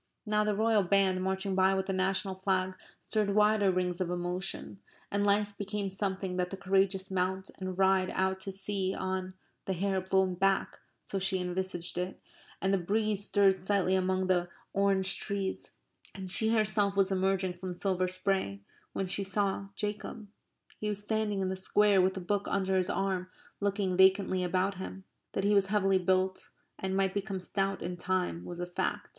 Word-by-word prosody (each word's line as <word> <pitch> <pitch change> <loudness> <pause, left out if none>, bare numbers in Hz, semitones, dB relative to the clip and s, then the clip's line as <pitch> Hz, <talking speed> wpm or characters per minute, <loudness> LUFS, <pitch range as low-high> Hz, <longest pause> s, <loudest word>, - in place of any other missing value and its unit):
Now 210 0 +2
the 210 -1 +1
royal 220 0 +3
band 190 0 +2
marching 190 +1 -1
by 190 0 +4
with 190 0 0
the 195 - -2
national 190 +1 0
flag 190 0 0 0.3
stirred 210 -2 -1
wider 210 -1 +4
rings 180 0 -1
of 180 - 0
emotion, 180 +2 -3 0.3
and 200 0 +1
life 205 0 +2
became 200 -1 -3
something 190 -1 -2
that 180 0 0
the 195 - -6
courageous 195 0 +1
mount 190 +1 -1
and 185 -1 -4
ride 190 -1 +3
out 190 0 +1
to 195 - -4
sea 195 0 -2
on 185 0 -3 0.3
the 190 - -1
hair 190 +1 0
blown 190 0 +2
back 195 +2 +1 0.3
(so 195 - -2
she 190 0 +1
envisaged 180 -1 -3
it, 180 +1 -4 0.4
and 190 +1 +1
the 195 - +3
breeze 205 +2 0
stirred 195 -2 +3
slightly 190 -1 +2
among 185 0 +1
the 180 -1 +1 0.2
orange 195 -1 +2
trees) 200 -2 -2 0.5
and 190 -2 -5
she 220 +3 +2
herself 205 -3 +2
was 195 0 +3
emerging 190 -1 +1
from 180 0 -6
silver 185 0 0
spray 185 - -1 0.3
when 195 - -1
she 195 +2 -1
saw 195 0 -1
Jacob. 210 +2 -4 0.5
He 210 - -2
was 205 0 -2
standing 210 -2 0
in 190 - 0
the 190 - -2
Square 200 +1 +3
with 190 +1 +1
a - - -3
book 200 +3 -1
under 190 -1 0
his 185 -1 +1
arm 190 -1 -1 0.3
looking 200 -2 0
vacantly 190 -1 +4
about 185 +2 0
him. 190 0 -7 0.3
That 195 - -1
he 205 +1 +3
was 200 -1 +4
heavily 195 -2 +3
built 185 +1 0 0.3
and 190 0 -1
might 190 -1 +1
become 195 -1 -2
stout 195 +1 -2
in 175 0 -4
time 180 -1 -1
was 175 0 -7
a 175 - -2
fact. 180 +1 -3
190 Hz, 180 wpm, -31 LUFS, 185-200 Hz, 0.5 s, by